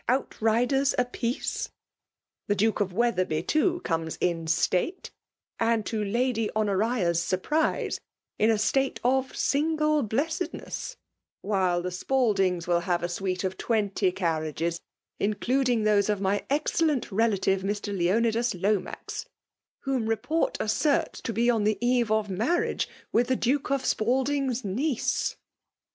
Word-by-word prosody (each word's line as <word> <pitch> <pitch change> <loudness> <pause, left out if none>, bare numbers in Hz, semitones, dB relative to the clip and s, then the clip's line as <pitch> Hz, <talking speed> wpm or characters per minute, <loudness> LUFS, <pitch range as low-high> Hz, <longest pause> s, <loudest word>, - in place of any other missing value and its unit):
outriders 250 +2 +1
iupieeie.. 245 0 -2 0.8
The 205 - +2
Duke 215 +2 +1
of 195 -2 0
Wetherby, 185 -7 0
too, 345 - +1
comes 165 -1 -2
in 170 -2 0
^tafe, 180 - 0 0.5
Aiid,»to 225 -1 0
Lady 225 +1 0
Honotia's 205 -4 +1
surprise, 300 - 0 0.4
in 215 - +4
a 225 - +3
state 270 +6 +1
of 260 +1 +1
vSingie 305 -2 +1
btessedness'; 320 - -3 0.5
while 185 -4 +1
the 180 - -2
Spaldings 190 -5 +1
wOl 175 -1 +2
vlivre 175 -1 -1
A - - +2
suito 185 +1 -2
'Of 190 0 -2
twenty 205 -4 +1
carriages, 165 -1 -2 0.4
including 240 +3 +1
Aose 210 -1 +3
of 210 -2 +1
my 200 +1 0
excellent 295 -2 +1
retire, 195 -2 +2
Mr. 205 +1 -3
Leoniilas 225 +3 +1
*Iiomax, 205 +1 -2 0.5
whom 265 -5 -1
report 245 +9 0
asserts 275 +7 +1
to 230 - -3
'be 230 +2 +1
on 225 -3 +1
the 215 0 +2
eye 245 0 +3
of 215 -1 +1
marriage 225 - 0 0.2
with 240 +1 +3
the 260 - +2
"Duke 260 +3 0
of 275 -1 0
Spaldin^s 260 +2 0
ilieoe.' 250 +7 -1
220 Hz, 125 wpm, -27 LUFS, 190-260 Hz, 0.8 s, in